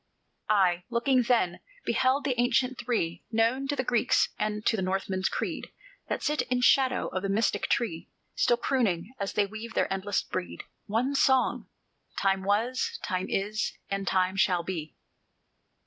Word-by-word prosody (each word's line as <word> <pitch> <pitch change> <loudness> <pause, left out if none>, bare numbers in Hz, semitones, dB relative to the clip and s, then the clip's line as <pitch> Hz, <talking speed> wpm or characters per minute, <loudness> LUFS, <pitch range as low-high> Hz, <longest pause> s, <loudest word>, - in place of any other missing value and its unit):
I, 185 -4 +3
looking 250 +2 +2
then, 230 -8 +1 0.3
beheld 260 +4 +2
the 270 - +1
ancient 250 +1 +1
Three 180 -9 -2
Known 235 +4 +1
to 290 - -1
the 260 - -1
Greek's 240 -1 +2
and 210 0 -2
to 225 - +3
the 205 - -2
Northman's 190 0 -1
creed, - - -3 0.4
That - - -2
sit 300 0 +1
in 250 0 -1
shadow 260 0 +3
of 185 - -3
the 195 - -2
mystic 215 +4 +1
Tree, 170 -9 -1 0.2
Still 240 - +2
crooning, 225 -6 0
as 200 -1 -3
they 205 - +2
weave 220 +3 -8
their - - +1
endless 195 +1 -1
brede, 185 -1 -5 0.2
One 235 +6 0
song: 265 -1 +2 0.5
"Time 195 -1 +1
was, 245 - 0
Time 185 -1 -2
is, 210 +2 -1 0.2
and 195 0 -2
Time 185 0 +2
shall 180 -3 +2
be." 165 -4 -5
215 Hz, 160 wpm, -28 LUFS, 190-250 Hz, 0.5 s, I